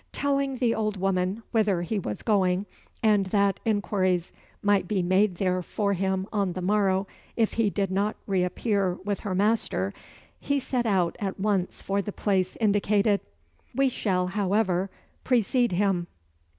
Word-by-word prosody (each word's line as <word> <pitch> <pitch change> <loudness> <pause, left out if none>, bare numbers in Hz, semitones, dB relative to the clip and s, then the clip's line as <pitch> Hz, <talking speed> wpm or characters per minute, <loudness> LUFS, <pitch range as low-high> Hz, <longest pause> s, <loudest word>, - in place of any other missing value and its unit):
Telling 275 -1 0
the 235 -2 +2
old 215 -2 -1
woman 190 +3 0
whither 205 -6 +2
he 210 +4 -1
was 105 - -5
going, 190 -2 +2 0.4
and 210 -3 +3
that 200 -1 +2
inquiries 185 -4 0 0.3
might 205 -3 +3
be 190 -2 0
made 185 +2 +3
there 185 0 0
for 200 +3 -1
him 190 0 -1
on 200 -4 0
the 185 - -4
morrow, 195 -1 +2 0.3
if 225 -2 +1
he 225 -2 +2
did 195 -1 -1
not 200 +3 0
re 190 -2 +1
appear 195 0 0
with 205 -1 -1
her 195 -3 -3
master, 200 - +1 0.5
he 280 0 0
set 250 -2 -1
out 185 -5 +1
at 195 -2 -3
once 195 -2 -1
for 200 +1 0
the 205 - -5
place 190 -3 0
indicated. 205 -1 +2 0.5
We 270 +1 +3
shall, 185 -7 0
however, 195 -1 0 0.3
precede 245 -2 +2
him. 180 -2 +1
200 Hz, 155 wpm, -26 LUFS, 185-215 Hz, 0.5 s, and